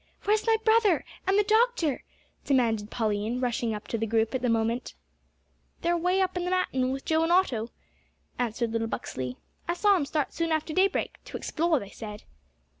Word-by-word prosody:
"Where 415 - +3
is 435 +1 0
my 450 0 +5
brother 440 -6 +4 0.2
and 385 +1 +3
the 415 - +5
doctor?" 435 - +2 0.4
demanded 225 -6 +1
Pauline, 220 +1 -1
running 235 -3 -1
up 210 - -8
to 230 - -1
the 225 - -1
group 225 +2 +1
at 260 - -1
the 250 - +1
moment. 230 +2 0 0.9
"They're 345 - +1
away 360 +3 +2
up 375 - +1
the 360 - -2
mountain, 350 -8 0
with 270 +1 -5
Joe 320 0 +2
and 330 +1 +1
Otto," 255 -12 +2 0.7
answered 235 -1 -1
little 225 0 -1
Buxley; 125 - -4 0.3
"I 345 - 0
saw 405 +3 +4
'em 305 -7 0
start 300 -1 -1
soon 330 -1 -1
after 315 0 -1
daybreak 380 +3 +1
to - - -6
explore, 330 0 +1
they 200 -3 -9
said." 210 -2 -8
275 Hz, 190 wpm, -27 LUFS, 225-365 Hz, 0.9 s, my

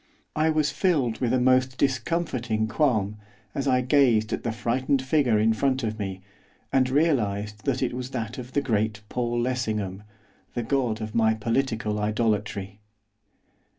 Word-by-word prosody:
I 155 +1 +2
was 155 -2 +2
filled 145 - +1
with 120 -2 0
a 130 - +3
most 130 0 +3
discomforting 130 -6 0
qualm, 110 -6 +1 0.4
as 140 - -2
I 125 -1 +3
gazed 125 -5 +3
at - - -2
the 115 - -2
frightened 120 +4 0
figure 130 -5 +2
in 110 +1 +3
front 130 +3 0
of 110 0 -3
me, 95 -2 -4 0.5
and 130 -1 +3
realised 105 -8 0
that 135 -1 0
it 125 - -1
was 125 0 -4
that 120 -2 -4
of 125 +1 -9
the 145 - +2
great 110 -4 -1
Paul 120 -1 -1
Lessingham, 110 -6 -2 0.5
the 120 - -1
god 115 -3 0
of 110 -1 -5
my 110 -1 +3
political 115 -1 -1
idolatry. 105 -2 -1
120 Hz, 155 wpm, -26 LUFS, 110-130 Hz, 0.5 s, a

